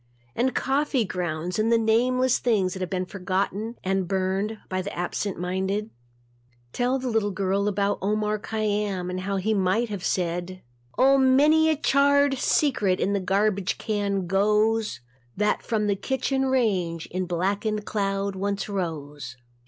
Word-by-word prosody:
And 255 Hz, +2 st, 0 dB
coffee 270 Hz, -2 st, +1 dB
grounds 175 Hz, 0 st, -3 dB
and 220 Hz, +2 st, +2 dB
the 230 Hz, -, +5 dB
nameless 250 Hz, +3 st, +2 dB
things 200 Hz, -7 st, +1 dB
that 190 Hz, -, -7 dB
have 185 Hz, -, -2 dB
been 185 Hz, -1 st, -2 dB
forgotten 200 Hz, +4 st, -2 dB
and 190 Hz, -1 st, 0 dB
burned 195 Hz, +3 st, -1 dB
by 185 Hz, 0 st, -2 dB
the 195 Hz, -, -5 dB
absent 180 Hz, +2 st, -2 dB
minded. 190 Hz, +4 st, -2 dB, 0.8 s
Tell 250 Hz, +2 st, +1 dB
the 260 Hz, -1 st, -4 dB
little 220 Hz, -3 st, +1 dB
girl 195 Hz, +1 st, 0 dB
about 200 Hz, 0 st, 0 dB
Omar 210 Hz, +2 st, 0 dB
Khayyam 205 Hz, -4 st, -2 dB
and 185 Hz, -, -3 dB
how 195 Hz, +2 st, -2 dB
he 205 Hz, +3 st, 0 dB
might 200 Hz, +4 st, +1 dB
have 200 Hz, -4 st, -5 dB
said. 180 Hz, +1 st, -2 dB, 0.3 s
Oh, 270 Hz, +1 st, +5 dB
many 295 Hz, +5 st, +5 dB
a 315 Hz, -, +3 dB
charred 285 Hz, -1 st, +3 dB
secret 220 Hz, -12 st, +2 dB
into 200 Hz, +1 st, +1 dB
the -, -, -7 dB
garbage 200 Hz, 0 st, +1 dB
can 200 Hz, -3 st, -1 dB
goes 210 Hz, -, +1 dB, 0.4 s
That 210 Hz, +1 st, +1 dB
from 220 Hz, -2 st, -1 dB
the 205 Hz, -1 st, +1 dB
kitchen 265 Hz, +4 st, -1 dB
range 190 Hz, -11 st, 0 dB
in 185 Hz, 0 st, -2 dB
blackened 200 Hz, +4 st, -1 dB
cloud 195 Hz, -1 st, -1 dB
once 200 Hz, +1 st, -2 dB
rose. 150 Hz, -, -5 dB
200 Hz, 150 wpm, -25 LUFS, 185-225 Hz, 0.8 s, the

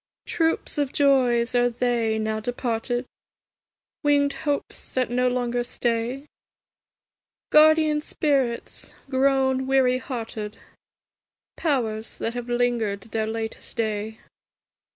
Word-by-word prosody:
Troops 325 Hz, -2 st, 0 dB
of 285 Hz, -2 st, 0 dB
joys 250 Hz, -4 st, +3 dB
are 245 Hz, 0 st, +3 dB
they, 235 Hz, -2 st, 0 dB
now 215 Hz, 0 st, -1 dB
departed? 245 Hz, +1 st, -2 dB, 1.0 s
Winged 285 Hz, -1 st, +3 dB, 0.2 s
hopes 285 Hz, -, -3 dB
that 255 Hz, -2 st, -1 dB
no 250 Hz, +1 st, +2 dB
longer 245 Hz, -1 st, 0 dB
stay? 240 Hz, +3 st, -2 dB, 1.3 s
Guardian 310 Hz, 0 st, +5 dB
spirits 275 Hz, -6 st, -1 dB, 0.2 s
grown 265 Hz, 0 st, +2 dB
weary 260 Hz, -1 st, +3 dB
hearted? 225 Hz, -5 st, -5 dB, 1.0 s
Powers 230 Hz, -8 st, -1 dB
that 230 Hz, -, -2 dB
have 245 Hz, 0 st, -5 dB
linger'd 240 Hz, -4 st, 0 dB
their 220 Hz, -1 st, -1 dB
latest 220 Hz, 0 st, -5 dB
day? 220 Hz, 0 st, -2 dB
245 Hz, 100 wpm, -24 LUFS, 225-270 Hz, 1.3 s, Guardian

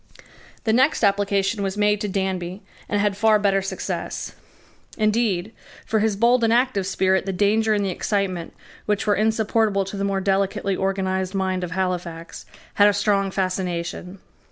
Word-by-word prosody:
The 220 Hz, -, +1 dB
next 260 Hz, +3 st, +3 dB
application 200 Hz, +1 st, +1 dB
was 195 Hz, 0 st, -2 dB
made 210 Hz, 0 st, +2 dB
to 210 Hz, -, -1 dB
Danby, 190 Hz, -1 st, -3 dB, 0.3 s
and 205 Hz, -, 0 dB
had 205 Hz, -1 st, +1 dB
far 215 Hz, +1 st, +4 dB
better 200 Hz, -1 st, +2 dB
success. 195 Hz, -, -4 dB, 0.6 s
Indeed, 215 Hz, -3 st, +1 dB, 0.3 s
for 220 Hz, -, +1 dB
his 215 Hz, -1 st, +1 dB
bold 235 Hz, +3 st, +3 dB
and 225 Hz, -, +3 dB
active 235 Hz, -5 st, +1 dB
spirit 190 Hz, 0 st, +1 dB
the -, -, 0 dB
danger 215 Hz, +3 st, +2 dB
and 205 Hz, -1 st, 0 dB
the 190 Hz, -, -1 dB
excitement, 185 Hz, -3 st, -2 dB, 0.3 s
which 210 Hz, -1 st, 0 dB
were 210 Hz, -, +3 dB
insupportable 220 Hz, -1 st, +1 dB
to 195 Hz, +1 st, -6 dB
the 200 Hz, -, -2 dB
more 195 Hz, -1 st, 0 dB
delicately 195 Hz, 0 st, 0 dB
organized 190 Hz, 0 st, -1 dB
mind 190 Hz, -1 st, -1 dB
of 180 Hz, -, -3 dB
Halifax, 175 Hz, -3 st, -4 dB, 0.3 s
had 205 Hz, -, +5 dB
a 205 Hz, -, +4 dB
strong 200 Hz, -1 st, +1 dB
fascination. 185 Hz, -1 st, -3 dB
200 Hz, 160 wpm, -23 LUFS, 190-210 Hz, 0.6 s, had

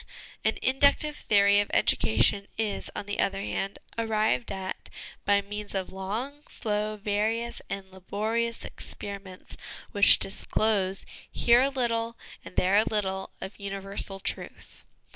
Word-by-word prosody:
An -, -, +1 dB
inductive 280 Hz, +3 st, +4 dB
theory 200 Hz, -3 st, +4 dB
of 205 Hz, -, 0 dB
education 155 Hz, -, +4 dB
is, 215 Hz, -2 st, -1 dB
on -, -, -4 dB
the 205 Hz, 0 st, -4 dB
other 195 Hz, 0 st, +1 dB
hand, 195 Hz, 0 st, -3 dB, 0.2 s
arrived 215 Hz, -, +1 dB
at 190 Hz, -1 st, -5 dB, 0.4 s
by 200 Hz, 0 st, +4 dB
means 210 Hz, 0 st, -6 dB
of 190 Hz, -1 st, -2 dB
long, 220 Hz, +10 st, -4 dB
slow, 215 Hz, -1 st, -1 dB
various, 215 Hz, +3 st, -1 dB
and 195 Hz, -1 st, -4 dB
laborious 220 Hz, +5 st, -2 dB
experiments 195 Hz, -2 st, -6 dB, 0.4 s
which 200 Hz, -1 st, +7 dB
disclose, 195 Hz, -1 st, 0 dB, 0.3 s
here 240 Hz, +1 st, +5 dB
a 270 Hz, -, +3 dB
little, 230 Hz, -3 st, -1 dB, 0.3 s
and -, -, -11 dB
there 190 Hz, +2 st, +3 dB
a 215 Hz, -, +6 dB
little, 190 Hz, -3 st, -1 dB
of 195 Hz, -, -7 dB
universal 195 Hz, 0 st, -3 dB
truth. -, -, -6 dB
205 Hz, 130 wpm, -28 LUFS, 195-225 Hz, 0.4 s, which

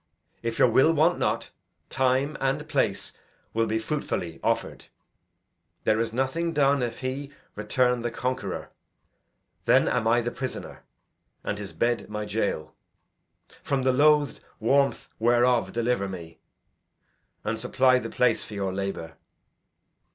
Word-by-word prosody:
If 115 Hz, -1 st, -3 dB
your -, -, +6 dB
will 130 Hz, +7 st, +5 dB
want 165 Hz, +3 st, +3 dB
not, -, -, -1 dB, 0.4 s
time 130 Hz, +3 st, +1 dB
and 135 Hz, 0 st, 0 dB
place -, -, 0 dB, 0.4 s
will 115 Hz, 0 st, +1 dB
be 110 Hz, -, 0 dB
fruitfully 110 Hz, -, -3 dB
offer'd. -, -, -1 dB, 1.0 s
There 110 Hz, 0 st, +2 dB
is 115 Hz, 0 st, 0 dB
nothing 135 Hz, +8 st, -1 dB
done, 140 Hz, -2 st, +3 dB
if 120 Hz, 0 st, -3 dB
he 135 Hz, +2 st, -4 dB, 0.2 s
return 125 Hz, +3 st, +1 dB
the 120 Hz, -, -1 dB
conqueror. 125 Hz, +2 st, -3 dB, 0.9 s
Then -, -, +5 dB
am 115 Hz, -3 st, +1 dB
I 120 Hz, +1 st, +4 dB
the 120 Hz, +1 st, -2 dB
prisoner, 130 Hz, -1 st, -6 dB, 0.6 s
and 105 Hz, -, -3 dB
his 100 Hz, -1 st, -6 dB
bed 120 Hz, 0 st, 0 dB
my 105 Hz, 0 st, -3 dB
jail; 100 Hz, -8 st, -2 dB, 0.9 s
from 135 Hz, -2 st, -1 dB
the 130 Hz, 0 st, +3 dB
loathed 150 Hz, 0 st, +4 dB, 0.2 s
warmth 135 Hz, +5 st, +2 dB
whereof 120 Hz, +1 st, +3 dB
deliver 115 Hz, -4 st, 0 dB
me, 85 Hz, -3 st, -9 dB, 1.0 s
and 110 Hz, +1 st, -2 dB
supply 130 Hz, +2 st, +3 dB
the -, -, -5 dB
place 125 Hz, -, +2 dB
for 105 Hz, -, -8 dB
your 95 Hz, -2 st, -2 dB
labour. 95 Hz, -4 st, -4 dB
120 Hz, 135 wpm, -26 LUFS, 110-135 Hz, 1.0 s, your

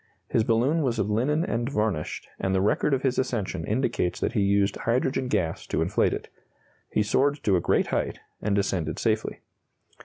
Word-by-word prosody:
His 110 Hz, -, +2 dB
balloon 125 Hz, +8 st, +2 dB
was 125 Hz, -5 st, 0 dB
of 105 Hz, -1 st, 0 dB
linen 145 Hz, +10 st, +1 dB
and 120 Hz, +2 st, -1 dB
varnished, 105 Hz, -, -2 dB
and 95 Hz, 0 st, 0 dB
the 95 Hz, -, +2 dB
record 105 Hz, +8 st, +2 dB
of 135 Hz, -1 st, +1 dB
his 130 Hz, -2 st, +1 dB
ascension 105 Hz, -9 st, -2 dB
indicates 105 Hz, -6 st, 0 dB
that -, -, -1 dB
he 115 Hz, -, +1 dB
used 100 Hz, 0 st, +2 dB
hydrogen 130 Hz, +2 st, 0 dB
gas 85 Hz, -9 st, -1 dB
to -, -, -1 dB
inflate -, -, +2 dB
it. -, -, -4 dB, 0.6 s
He 105 Hz, -, +1 dB
soared 140 Hz, +7 st, +1 dB
to 100 Hz, -, +3 dB
a 90 Hz, -, +2 dB
great -, -, +2 dB
height, -, -, -1 dB, 0.2 s
and 100 Hz, -1 st, 0 dB
descended 95 Hz, -5 st, -1 dB
safely. 110 Hz, -1 st, -1 dB
110 Hz, 185 wpm, -26 LUFS, 100-130 Hz, 0.6 s, to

